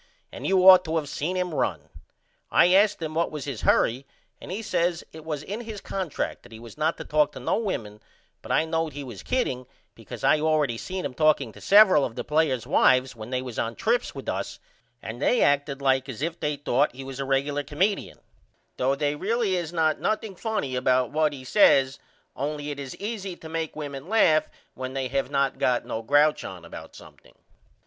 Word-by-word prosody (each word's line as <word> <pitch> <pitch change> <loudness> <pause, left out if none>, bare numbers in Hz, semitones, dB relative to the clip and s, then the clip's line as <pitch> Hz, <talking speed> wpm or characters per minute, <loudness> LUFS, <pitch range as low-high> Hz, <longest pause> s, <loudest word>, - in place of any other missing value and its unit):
And - - -6
you 190 -1 +4
ought 185 -1 +10
to 160 0 -1
of 150 -2 -2
seen 155 +5 -3
him 180 -2 -2
run. - - -2 0.6
I 180 - +5
asked 205 +2 +4
him 160 -2 -4
what 165 +1 0
was 150 -3 -6
his 135 -6 -5
hurry 130 +4 +2 0.3
and - - -8
he 210 +4 -4
says 170 -4 0
it 160 0 -10
was 150 -2 -4
in 205 +7 -5
his 220 -3 -7
contract 190 -5 -4
that 120 - -17
he 110 - -10
was 115 -1 -12
not 155 +2 0
to - - -6
talk 150 -1 +2
to - - -8
no - - 0
women 110 - -4 0.4
but - - -8
I 160 - +3
knowed 160 -1 -2
he 145 0 -6
was 120 -7 -9
kidding 130 - -2 0.3
because - - -10
I 155 - +4
allready 150 -6 +1
seen 185 0 -5
him - - -4
talking 150 -5 +2
to - - -14
severel 200 -7 +6
of 115 - -3
the - - -4
players' 150 -6 +1
wifes 130 0 +3
when 110 0 -9
they 130 0 -2
was 125 -3 -6
on 115 0 -2
trips 240 +2 0
with - - -8
us - - -3 0.5
and - - -7
they 245 - +3
acted 140 -1 +1
like 135 0 +2
as 130 +2 -5
if 165 +1 -3
they 150 0 -1
thought 140 -1 0
he 135 - -7
was 135 0 -8
a 135 - -2
regular 140 +2 0
comeedion 185 +9 -1 0.6
though 130 +2 +1
they 145 +1 0
really 205 +4 0
is 170 -3 -3
not 160 -2 +1
nothing 215 -2 -2
funny 210 - -2
about 125 0 +2
what 155 0 +2
he 135 -3 -9
says 135 -4 +4 0.4
only 145 +1 -3
it 145 - -6
is 135 -2 -7
easy 200 -3 -5
to 160 - -11
make 160 0 -4
women 145 -1 -6
laugh 160 -8 +3 0.2
when 130 0 -6
they 130 -1 -2
have 135 0 -1
not 140 -1 0
got 125 -1 +1
no 110 - -4
grouch 145 +6 +3
on 90 -3 -8
about - - -10
something. - - -16
150 Hz, 215 wpm, -25 LUFS, 135-175 Hz, 0.6 s, ought